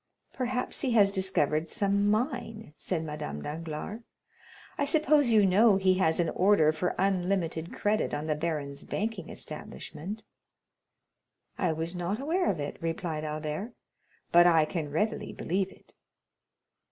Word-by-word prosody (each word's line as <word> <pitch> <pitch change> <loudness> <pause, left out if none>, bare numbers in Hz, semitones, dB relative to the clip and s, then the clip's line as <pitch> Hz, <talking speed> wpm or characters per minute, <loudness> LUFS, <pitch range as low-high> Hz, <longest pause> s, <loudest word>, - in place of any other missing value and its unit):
"Perhaps 250 -1 -2
he 260 -4 0
has 205 -3 +5
discovered 165 -5 +1
some 200 0 +1
mine," 220 - -2
said 165 -2 -2
Madame 110 - -5
Danglars. 160 +7 -5 0.7
"I - - -1
suppose 300 -2 +3
you 215 -3 +6
know 200 +2 +5
he 190 -1 +3
has 160 -3 +2
an 170 -2 +2
order 185 -5 +4
for 155 +3 -2
unlimited 180 -3 0
credit 210 +1 0
on 145 +1 -3
the 155 - +1
baron's 150 -3 -3
banking 215 -4 -3
establishment?" 205 +8 -7 1.4
"I 180 -4 +2
was 165 +3 -3
not 175 +5 -2
aware 335 +7 +1
of 175 - -1
it," 145 0 -4
replied 165 -1 -3
Albert, 155 +8 -4 0.6
"but 175 +1 +7
I 165 -3 +5
can 155 -2 -3
readily 210 +10 -1
believe 190 +2 -1
it." - - -20
180 Hz, 140 wpm, -29 LUFS, 155-210 Hz, 1.4 s, but